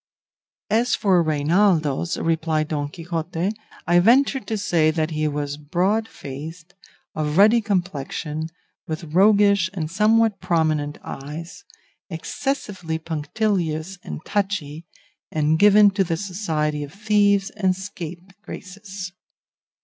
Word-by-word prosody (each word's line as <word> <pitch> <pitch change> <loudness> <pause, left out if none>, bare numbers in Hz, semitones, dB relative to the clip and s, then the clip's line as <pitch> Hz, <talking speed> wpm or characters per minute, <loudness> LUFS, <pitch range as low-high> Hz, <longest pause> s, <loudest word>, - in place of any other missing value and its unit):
"As 235 +3 +3
for 190 -4 +3
Reinaldos," 160 0 +2
replied 160 -1 0
Don 145 -2 -2
Quixote, 165 +3 -3 0.3
"I 175 0 +4
venture 265 +8 +4
to 225 -3 -4
say 170 -6 +2
that 155 0 -1
he 155 0 0
was 145 -1 -3
broad 185 +9 0
faced, 160 +6 -9 0.4
of 150 0 -2
ruddy 215 +4 +6
complexion, 160 -5 -2 0.4
with 160 +1 -4
roguish 200 0 +5
and 160 -3 -3
somewhat 215 +1 +3
prominent 155 -5 0
eyes, 160 - -8 0.4
excessively 180 - -3
punctilious 165 +2 -2
and - - -7
touchy, 175 -6 -2 0.4
and 155 +1 +1
given 205 0 +7
to 195 0 +1
the 165 -2 -2
society 160 -6 -2
of 145 - -8
thieves 205 0 +2
and 190 -3 0
scapegraces. 190 +1 -8
175 Hz, 110 wpm, -23 LUFS, 155-200 Hz, 0.4 s, given